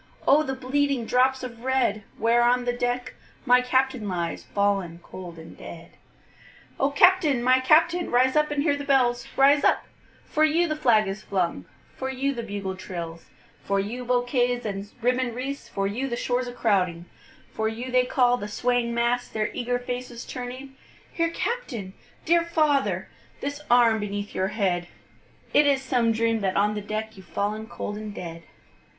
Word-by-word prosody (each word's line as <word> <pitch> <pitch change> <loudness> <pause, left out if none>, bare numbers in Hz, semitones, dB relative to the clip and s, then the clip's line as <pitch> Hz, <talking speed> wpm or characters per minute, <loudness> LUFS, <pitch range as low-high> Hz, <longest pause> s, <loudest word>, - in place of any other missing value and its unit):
O 290 +2 +6
the 265 -3 -3
bleeding 265 -1 0
drops 260 +2 +2
of 235 -2 -8
red, 260 -5 +1 0.2
Where 230 +2 +3
on 245 +1 +3
the 245 - 0
deck 245 0 -2 0.3
my 250 -1 +5
Captain 255 -3 0
lies, 170 -2 -2
Fallen 195 -4 -1
cold 175 -3 -9
and 160 0 -11
dead. 170 0 -11 0.9
O 275 - +3
Captain! 305 -4 +4
my 255 +1 +5
Captain! 330 +6 +3
rise 255 +2 +3
up 300 0 +3
and 290 -1 0
hear 295 -3 +2
the 285 - -5
bells; 245 -4 +2
Rise 280 +2 +5
up - - +3 0.4
for 310 - +1
you 325 +3 +3
the 310 - -1
flag 235 -8 +3
is 195 +2 -4
flung 180 - -2 0.3
for 265 - -4
you 270 +1 -1
the 240 - -4
bugle 200 -4 -4
trills, 170 -3 -7 0.4
For 200 0 0
you 225 +6 -4
bouquets 245 0 +1
and 200 -1 -4
ribbon'd 250 -1 +1
wreaths 275 +3 -5
for 195 - -2
you 240 +7 -2
the 240 - -2
shores 250 +1 -1
a - - -5
crowding, 185 -8 0 0.5
For 220 - -1
you 235 +4 -4
they 250 0 +4
call, 245 -1 +3
the 205 - -5
swaying 240 +2 0
mass, 240 +1 +1
their 215 0 -2
eager 245 0 -1
faces 245 -1 -6
turning; 255 +2 -7 0.4
Here 335 0 +1
Captain! 280 - -4 0.3
dear 340 +1 +4
father! 310 -5 +1 0.3
The 285 +1 -4
arm 235 -2 +5
beneath 205 0 -4
your 190 - 0
head! 185 -4 -1 0.7
It 295 - +5
is 275 -2 +2
some 245 -3 +2
dream 225 0 +1
that 195 -2 -1
on 210 +1 +3
the 210 - -4
deck, 215 +1 -5
You've 190 -2 -14
fallen 210 +5 -2
cold 205 -3 -5
and 210 -1 -7
dead. 165 -1 -7
245 Hz, 175 wpm, -25 LUFS, 210-265 Hz, 0.9 s, O